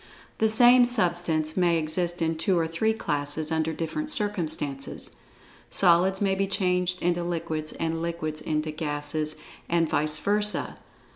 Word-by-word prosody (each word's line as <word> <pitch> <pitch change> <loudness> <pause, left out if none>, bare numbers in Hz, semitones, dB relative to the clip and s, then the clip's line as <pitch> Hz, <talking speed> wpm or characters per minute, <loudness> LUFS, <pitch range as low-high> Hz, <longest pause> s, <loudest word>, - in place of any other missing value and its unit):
The 220 - +3
same 245 +3 +6
substance 175 -9 +1
may 175 -2 +2
exist 170 +2 -1
in 165 0 0
two 180 +3 0
or 165 - +1
three 165 +7 0
classes, 150 -5 -2
under 160 0 0
different 165 - -4
circumstances. 160 - -2 0.6
Solids 185 +1 +4
may 195 -2 +1
be 195 +1 -1
changed 180 -2 0
into 175 0 0
liquids, 160 -3 -3
and 165 0 -3
liquids 155 -2 -4
into 155 0 -2
gases, 150 0 -3 0.3
and 170 -1 +1
vice 150 0 +2
versa. 210 +5 +2
170 Hz, 140 wpm, -26 LUFS, 155-190 Hz, 0.6 s, same